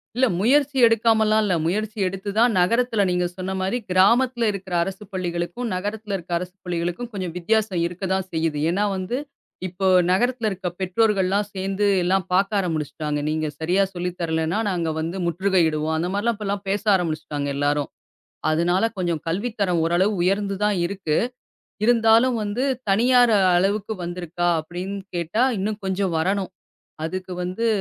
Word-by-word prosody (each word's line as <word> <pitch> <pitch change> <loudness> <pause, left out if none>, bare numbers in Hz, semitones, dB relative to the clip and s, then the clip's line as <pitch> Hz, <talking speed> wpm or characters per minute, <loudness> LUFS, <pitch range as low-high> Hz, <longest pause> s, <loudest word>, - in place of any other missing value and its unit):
இல்ல. 255 +2 +4 0.2
முயற்சி 280 +4 +3
எடுக்காமல்லாம் 220 -1 +3
இல்ல. 195 - +1
முயற்சி 215 +5 -2
எடுத்துதான் 200 +5 +1
நகரத்துல 225 +3 +2
நீங்கச் 180 0 0
சொன்ன 185 +1 -3
மாரி 190 +6 0
கிராமத்துல 235 +6 +3
இருக்குற 190 -2 -7
அரசுப் 195 +2 -7
பள்ளிகளுக்கும், 175 +5 -3
நகரத்துல 205 +2 -3
இருக்குற 175 -1 -4
அரசுப் 180 +2 -9
பள்ளிகளுக்கும் 175 +6 -3
கொஞ்சம் 185 -4 -4
வித்தியாசம் 205 0 +1
இருக்கத்தான் 190 +2 -2
செய்யுது. 160 -2 -1
ஏன்னா 200 +4 +1
வந்து 185 +7 -3 0.5
இப்போ 185 +2 -4 0.2
நகரத்துல 230 +4 +1
இருக்க 190 -2 -4
பெற்றோர்கள்லாம் 195 +1 +1
சேர்ந்து 195 +1 -1 0.2
எல்லாம் 185 +2 +1
பார்க்க 195 +3 +2
ஆரம்பிச்சிட்டாங்க. 155 -4 -2
நீங்கச் 155 -1 -2
சரியா 180 +5 +2
சொல்லித் 180 0 -4
தரலைன்னா, 160 +3 0
நாங்க 170 -4 -1
வந்து 165 +4 -3
முற்றுகையிடுவோம். 165 -3 +1
அந்த 170 +3 -1
மாதிரி 230 +4 +1
எல்லாம் 200 0 -3
பேச 200 +1 -1
ஆரம்பிச்சிட்டாங்க 155 -5 -2
எல்லாரும். 145 0 0 0.6
அதனால 175 +5 +2
கொஞ்சம் 175 -4 -1
கல்வித்தரம் 200 -1 -1
ஓரளவு 175 +5 +2
உயர்ந்து 195 +2 +1
தான் 210 -1 +2
இருக்கு. 180 -5 -2 0.7
இருந்தாலும் 230 +1 +4
வந்து 210 +4 -2 0.3
தனியார் 245 +3 +5 0.2
அளவுக்கு 200 +4 0
வந்திருக்கா, 175 0 -2
அப்படின்னு 180 +5 -6 0.2
கேட்டா 170 +7 0 0.2
இன்னும் 205 +2 -3
கொஞ்சம் 190 -2 -1
வரணும். 190 +3 -1 0.5
அதுக்கு 185 +2 -5
வந்து 185 +6 -2
190 Hz, 140 wpm, -23 LUFS, 175-210 Hz, 0.7 s, தனியார்